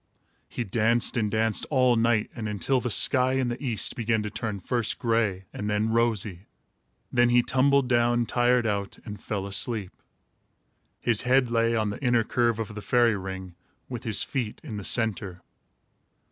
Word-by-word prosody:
He 120 - -4
danced 115 +3 +1
and 110 -4 0
danced, 110 0 0
all 130 -4 +3
night 115 -1 +1
and 110 -3 -4
until 125 +6 0
the 125 - -2
sky 130 +3 +4
in 130 -2 0
the 120 +4 -5
east 120 -6 -2
began 110 -2 0
to 105 - -5
turn, 110 -1 -4
first 115 +3 -2
gray 110 -5 0
and 105 - -4
then 105 +2 0
rosy. 110 -5 -1 0.6
Then 120 0 +3
he 120 0 +4
tumbled 135 +1 +2
down, 120 -1 +2
tired 120 0 +2
out, 100 -2 -2
and 105 -3 -8
fell 100 -2 -4
asleep. 100 0 -1 1.1
His 115 -4 +3
head 125 -1 +2
lay 115 0 +2
on 110 -2 0
the 100 - -8
inner 120 -2 +3
curve 120 0 0
of 110 -1 -5
the 105 - -7
fairy 120 +2 +2
ring, 95 -2 -7 0.4
with 120 -3 -6
his 110 -3 +1
feet 125 -7 -4
in 110 - -6
the 100 - -6
centre. 105 -6 -1
115 Hz, 175 wpm, -26 LUFS, 105-120 Hz, 1.1 s, sky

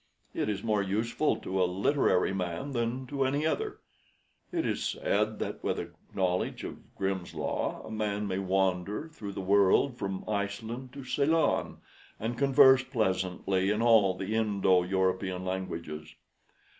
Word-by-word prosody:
It - - -1
is 100 -1 -2
more 105 -3 +1
useful 110 +9 0
to 95 0 -2
a - - +5
literary 95 -1 +2
man 90 +7 -3
than 120 +1 -1
to 135 +1 -1
any 140 +3 0
other. 415 - -1 0.7
It 335 -2 -1
is - - -1
said - - 0
that - - -4
with - - 0
a - - -5 0.2
knowledge 90 -2 0
of - - -9
Grimm's 95 -2 -3
Law - - -2
a - - -8
man 105 -1 -1
may 95 -1 -1
wander 95 - 0
through 105 -11 -7
the 95 - -4
world 100 +6 +3
from 95 -1 -4
Iceland 110 +5 -3
to 140 -1 -8
Ceylon, 145 +5 +1 0.4
and 115 +3 -2
converse 135 -1 +6
pleasantly 95 -5 0
in 105 +2 +1
all 110 -6 +5
the 95 +3 -4
Indo 100 -4 +3
European 95 0 0
languages. 85 -4 -5
100 Hz, 150 wpm, -30 LUFS, 95-125 Hz, 0.7 s, converse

